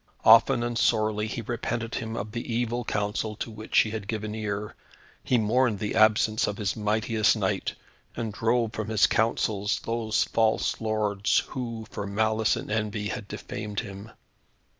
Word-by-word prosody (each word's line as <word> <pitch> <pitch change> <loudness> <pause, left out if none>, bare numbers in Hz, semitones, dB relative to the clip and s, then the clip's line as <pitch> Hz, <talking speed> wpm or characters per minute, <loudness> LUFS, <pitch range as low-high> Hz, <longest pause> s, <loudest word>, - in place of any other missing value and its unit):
Often 115 +2 +7
and 120 -1 -1
sorely 110 -1 +2
he 115 +1 -4
repented 120 0 -3
him 110 -1 -3
of 105 +1 -4
the 120 +1 -5
evil 120 +1 -1
counsel 105 0 -2
to 115 - -5
which 110 0 -3
he 110 - -2
had 110 -3 -5
given 110 0 -3
ear. 105 -1 -3 0.5
He 125 - +2
mourned 115 +1 +2
the 105 +1 -3
absence 110 0 +3
of 105 - -3
his 100 -3 -1
mightiest 110 +1 +2
knight, - - -1 0.4
and 115 -3 -3
drove 115 +1 +1
from 110 0 -4
his 110 -2 +4
councils 110 -2 +1
those 115 -2 0
false 110 0 +1
lords 105 -2 +1
who, 115 -3 -5
for 100 - -4
malice 110 +2 +1
and - - -6
envy, 105 -1 -1
had 100 - -5
defamed 105 -1 -5
him. 100 +2 -9
110 Hz, 160 wpm, -27 LUFS, 105-115 Hz, 0.5 s, Often